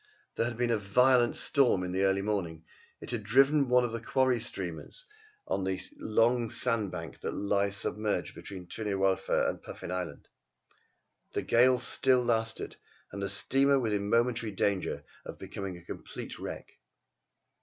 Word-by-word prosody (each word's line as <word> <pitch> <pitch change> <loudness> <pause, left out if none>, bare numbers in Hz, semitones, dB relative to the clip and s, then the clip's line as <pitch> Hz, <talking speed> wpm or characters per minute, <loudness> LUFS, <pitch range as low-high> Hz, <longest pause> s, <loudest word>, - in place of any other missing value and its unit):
There 115 - 0
had 120 -1 -5
been 120 -1 +1
a 115 - +2
violent 120 +4 +4
storm 125 -10 +3
in 90 - -3
the 95 +2 +1
early 95 0 +2
morning. 85 -6 -2 0.4
It - - -6
had 120 -3 -2
driven 135 +6 +4
one 125 0 +5
of 120 - -3
the 115 -1 -4
quarry 130 -1 +2
steamers 100 - -5 0.4
on 100 - -1
to 95 0 -1
the - - -9 0.2
long 115 +2 +2
sand 115 -5 0
bank 80 -5 -7
that - - -4
lies 100 0 +1
submerged 105 0 -1
between 95 -2 -9
Tryn 105 +5 -6
yr 100 -1 0
Wylfa 95 0 +2
and - - -3
Puffin - - -8
Island. 90 -2 -5 1.1
The - - -1
gale 125 +2 +5
still 125 -1 +2
lasted, 115 -1 -1 0.3
and 100 - -6
the 100 - -2
steamer 135 +7 +3
was 115 -4 0
in 100 0 -1
momentary 115 -1 +1
danger 100 -1 -1 0.2
of - - -8
becoming 95 -2 -6
a 85 - -15
complete - - -8
wreck. - - -8
110 Hz, 170 wpm, -30 LUFS, 95-125 Hz, 1.1 s, one